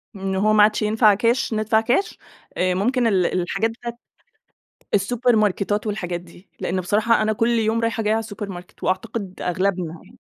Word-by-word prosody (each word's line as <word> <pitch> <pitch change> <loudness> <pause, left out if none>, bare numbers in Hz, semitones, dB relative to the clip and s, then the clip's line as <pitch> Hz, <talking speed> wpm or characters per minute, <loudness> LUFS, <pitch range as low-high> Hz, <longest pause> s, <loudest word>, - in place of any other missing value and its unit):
إن 190 0 -3
هو 215 +3 +2
ما 210 -1 +6
عادش 215 +1 +2
ينفع 215 0 +4
كاش 230 +3 +1
ندفع 215 +1 +2
كاش، 250 - 0 0.4
آآ 185 0 +2
ممكن 240 +5 +1
ال 190 -4 +2 0.2
الحاجات 195 +6 -1
بتاعة 235 +1 -7 1.0
السوبرماركتات 210 -1 +1
والحاجات 180 -4 -3
دي، 175 +2 -17
لأن 185 +1 -1
بصراحة 215 +5 +2
أنا 215 0 +1
كل 230 +3 +1
يوم 225 0 +1
رايحة 230 -1 -1
جايّة 215 +1 +2
على - - +1
السوبر 205 -2 -6
ماركت، 180 -1 -10
وأعتقد 185 +1 -3
أغلبنا 180 -2 -1
يعني، 220 +6 -19
210 Hz, 170 wpm, -22 LUFS, 190-225 Hz, 1.0 s, ما